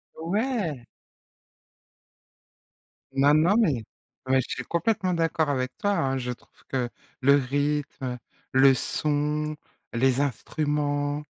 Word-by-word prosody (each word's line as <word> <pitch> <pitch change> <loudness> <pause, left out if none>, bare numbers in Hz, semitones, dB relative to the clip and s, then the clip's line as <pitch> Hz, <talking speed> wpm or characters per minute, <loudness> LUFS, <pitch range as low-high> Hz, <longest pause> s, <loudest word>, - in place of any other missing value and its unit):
Ouais! 175 - -2 2.3
Non, 140 +2 +4
non 165 +7 +4
mais 145 - +2 0.4
ouais 130 0 +4
je - - -8
suis - - -3
complètement 185 0 0
d'accord 165 -2 +1
avec 130 -2 -1
toi, 205 - 0
hein. 135 -8 +1
Je 125 0 -3
trouve 120 - -14
que 125 -2 -1 0.3
le 140 +2 +6
rythme, 145 +1 -1
heu, 125 -1 -3 0.3
le 135 +1 +6
son, 150 +3 -1 0.4
les 130 +3 +2
instruments, 145 +1 -1
145 Hz, 115 wpm, -26 LUFS, 135-160 Hz, 2.3 s, le